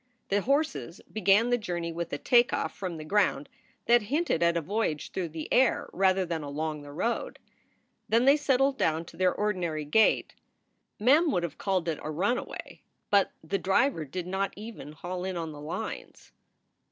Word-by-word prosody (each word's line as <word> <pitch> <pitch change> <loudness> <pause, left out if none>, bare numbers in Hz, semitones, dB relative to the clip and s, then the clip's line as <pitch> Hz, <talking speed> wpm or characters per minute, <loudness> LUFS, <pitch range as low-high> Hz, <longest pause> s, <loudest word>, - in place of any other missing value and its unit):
The 200 +1 +2
horses 215 - -1
began 215 +3 +3
the 245 - +3
journey 175 -5 -3
with 170 0 -4
a - - -2
take 240 0 +4
off - - -2
from 180 -3 -5
the 155 - -8
ground 185 -6 +1 0.4
that 240 0 +5
hinted 280 - 0
at 170 0 +3
a - - +3
voyage 180 -3 -2
through 180 -3 -3
the 155 0 -6
air 260 -1 +3
rather 190 0 +3
than 165 -2 -3
along 150 +1 -4
the 145 0 -10
road. 230 +11 -2 0.7
Then 230 +3 +3
they 275 +1 +7
settled 275 -2 +2
down 160 +1 +1
to - - -13
their 185 0 +3
ordinary 175 -8 -2
gait. 215 +10 +3 0.7
Mem 290 +10 +5
would 175 - 0
have 170 -3 -5
called 185 -3 0
it 160 -2 -1
a - - -5
runaway, 195 +11 -3 0.3
but 200 -1 +4
the 195 +5 -1
driver 195 - +2
did 170 +5 -5
not 190 +2 -2
even 210 -7 -9
haul 180 +3 -5
in 185 -1 -3
on 165 -2 -4
the 145 -1 -10
lines. 180 +9 -6
185 Hz, 180 wpm, -28 LUFS, 165-225 Hz, 0.7 s, they